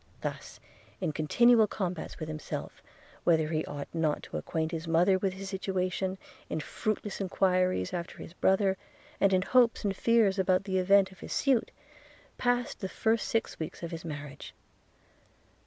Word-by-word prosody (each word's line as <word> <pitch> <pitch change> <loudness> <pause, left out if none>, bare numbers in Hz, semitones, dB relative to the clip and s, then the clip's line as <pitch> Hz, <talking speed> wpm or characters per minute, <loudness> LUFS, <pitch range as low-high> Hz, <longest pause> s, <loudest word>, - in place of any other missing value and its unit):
Thus, - - -5 0.4
in - - -1
continual 220 +9 +4
combats 180 -5 -4
with 155 - -5
himself, 155 -1 -6 0.4
whether 160 -2 +3
he 155 -1 0
ought 145 -1 -6
not 160 -3 0
to - - -5
acquaint 160 - -2
his 165 -1 -4
mother 175 +4 +4
with 190 -1 0
his 195 +1 -7
situation, 190 -1 -2 0.3
in - - -2
fruitless 210 +4 -3
enquiries 185 - +1
after 170 -1 -4
his 165 - -9
brother, 190 +1 +2 0.4
and 195 - +4
in 185 -1 +3
hopes 240 +2 +3
and 200 -2 0
fears 220 -3 +3
about 185 0 +3
the 190 -1 0
event 195 +1 +4
of 190 - -16
his - - -6
suit, 265 -5 +2 0.7
passed 245 0 0
the 190 - -4
first 225 +3 +1
six 225 - -1
weeks 160 +1 -6
of 170 - -4
his 165 -1 -6
marriage. 145 -3 -7
185 Hz, 160 wpm, -30 LUFS, 165-200 Hz, 0.7 s, continual